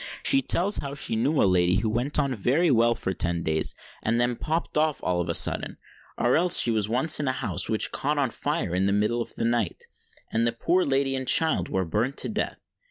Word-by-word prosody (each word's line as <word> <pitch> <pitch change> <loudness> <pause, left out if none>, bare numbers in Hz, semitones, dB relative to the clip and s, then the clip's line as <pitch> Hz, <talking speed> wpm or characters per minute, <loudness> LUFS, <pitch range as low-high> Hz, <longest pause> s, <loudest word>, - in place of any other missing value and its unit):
She 275 -1 +5
tells 200 -4 0
how 140 0 -6
she 140 - -2
knew 135 +7 0
a - - +4
lady 90 -1 +3
who 105 +3 0
went 125 +6 -1
on 140 -3 +1
very 140 - +1
well 120 -1 +3
for 95 - -3
ten 85 -2 -2
days, 80 0 -1 0.3
and 115 +2 0
then 120 0 +1
popped 160 +7 -3
off 155 -1 +1
all 90 -1 0
on 85 0 -3
a 85 - 0
sudden; - - +2 0.4
or 120 - +2
else 175 +2 +3
she 120 - +3
was 110 -2 -1
once 130 +8 +2
in 145 - -2
a - - +2
house 95 -8 -3
which 110 -1 +1
caught 145 +2 -1
on 135 -4 0
fire 85 - -3
in 95 +2 +1
the 100 - +1
middle 105 +4 0
of - - -7
the - - -2
night, 120 0 -1 0.5
and 115 +1 +1
the 115 - 0
poor 175 +10 +1
lady 135 0 0
and 130 -1 -4
child 160 +4 +3
were 95 -1 -1
burnt 110 +11 -2
to - - -2
death. 220 0 -3
120 Hz, 235 wpm, -25 LUFS, 105-145 Hz, 0.5 s, She